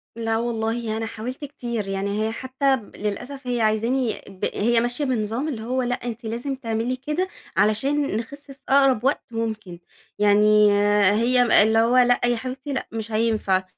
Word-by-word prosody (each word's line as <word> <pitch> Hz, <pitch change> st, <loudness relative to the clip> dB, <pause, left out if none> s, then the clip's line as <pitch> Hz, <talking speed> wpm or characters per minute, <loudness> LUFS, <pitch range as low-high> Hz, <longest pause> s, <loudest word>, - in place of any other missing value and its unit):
لا 225 Hz, -1 st, -1 dB
والله 225 Hz, -1 st, -2 dB
أنا 225 Hz, -, -2 dB
حاولت 245 Hz, +6 st, -6 dB
كتير، 235 Hz, -7 st, -5 dB
يعني 200 Hz, +2 st, -1 dB
هي 220 Hz, -, -2 dB
حتى 260 Hz, +3 st, 0 dB
للأسف 245 Hz, +4 st, -6 dB
هي 245 Hz, -2 st, 0 dB
عايزاني 225 Hz, +3 st, 0 dB
ب 195 Hz, -2 st, -5 dB
هي 235 Hz, +3 st, +2 dB
ماشية 245 Hz, +5 st, -1 dB
بنظام 235 Hz, +2 st, -1 dB
اللي 240 Hz, -8 st, -4 dB
هو 255 Hz, +3 st, -1 dB
لأ 245 Hz, 0 st, 0 dB
أنتِ 240 Hz, -1 st, -7 dB
لازم 240 Hz, +5 st, -3 dB
تعملي 230 Hz, 0 st, -2 dB
كده 300 Hz, +8 st, -2 dB, 0.3 s
علشان 270 Hz, +5 st, +1 dB
نخس 280 Hz, +5 st, -8 dB
في 270 Hz, -, -11 dB
أقرب 270 Hz, -4 st, +4 dB
وقت 270 Hz, +2 st, +1 dB
ممكن، 215 Hz, -6 st, -4 dB, 0.4 s
يعني 210 Hz, 0 st, +5 dB, 0.4 s
هي 240 Hz, +1 st, +4 dB
اللي 220 Hz, +1 st, +3 dB
هو 235 Hz, +3 st, +3 dB
لا 245 Hz, -1 st, +5 dB
يا 240 Hz, 0 st, +2 dB
حبيبتي 260 Hz, +3 st, -5 dB
لأ 260 Hz, -, -3 dB
مش 225 Hz, 0 st, -5 dB
هينفع 215 Hz, -4 st, +1 dB
230 Hz, 165 wpm, -23 LUFS, 220-255 Hz, 0.4 s, يعني